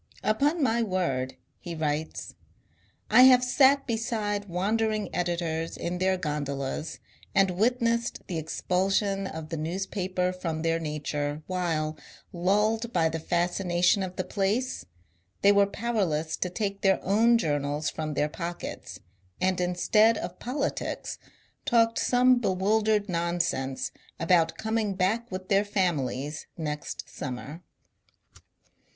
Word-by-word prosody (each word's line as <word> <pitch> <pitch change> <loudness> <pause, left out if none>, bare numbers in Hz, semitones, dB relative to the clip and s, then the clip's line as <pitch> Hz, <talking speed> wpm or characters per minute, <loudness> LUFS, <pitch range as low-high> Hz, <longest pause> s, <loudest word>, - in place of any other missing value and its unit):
" - - -22
Upon 285 - +2
my 235 -2 +2
word," 175 - -1 0.2
he 170 -1 -6
writes, 155 0 -3
*^ - - -37 0.8
I - - +10
have 250 -1 +6
sat 275 +2 +4
beside 220 -3 -2
wandering 215 +4 0
editors 170 -2 -2
in 175 +1 -3
their 190 0 +2
^n 150 -4 -2
dolas 140 +3 -4 0.4
and 195 -1 +4
witnessed 235 +4 0
the 170 -3 -3
expulsion 195 +4 0
of 160 -2 -7
the 165 - -3
newspaper 185 +2 -2
from 165 -3 -4
their 165 0 +1
nature, 150 -1 -3
while, 165 -4 -2 0.3
lulled 210 +6 +1
by 165 -5 +2
the 160 +1 -3
fascination 175 +2 +1
of 185 -1 -4
the 185 - -1
place, 210 +8 -1 0.6
they 200 - +7
were 200 0 +5
powerless 190 -9 -1
to 180 - -1
take 200 +1 -3
their 195 -1 +3
own 225 +5 +4
journals 145 -4 -1
from 155 -2 -4
their 150 - +2
pockets, 170 +2 -6 0.4
and 185 -1 +1
instead 210 +5 +3
of 175 +1 -6
politics 270 +4 -3 0.4
talked 230 -1 +3
some 250 0 +4
bewildered 210 +1 +1
non 170 -1 -1
sense 135 -6 -1 0.3
about 165 0 +3
coming 220 -2 -1
back 215 +6 0
with 185 0 -5
their 200 0 +3
families 155 -8 -1
next 150 -2 -4
summer." 140 +5 -6
185 Hz, 130 wpm, -27 LUFS, 160-215 Hz, 0.8 s, I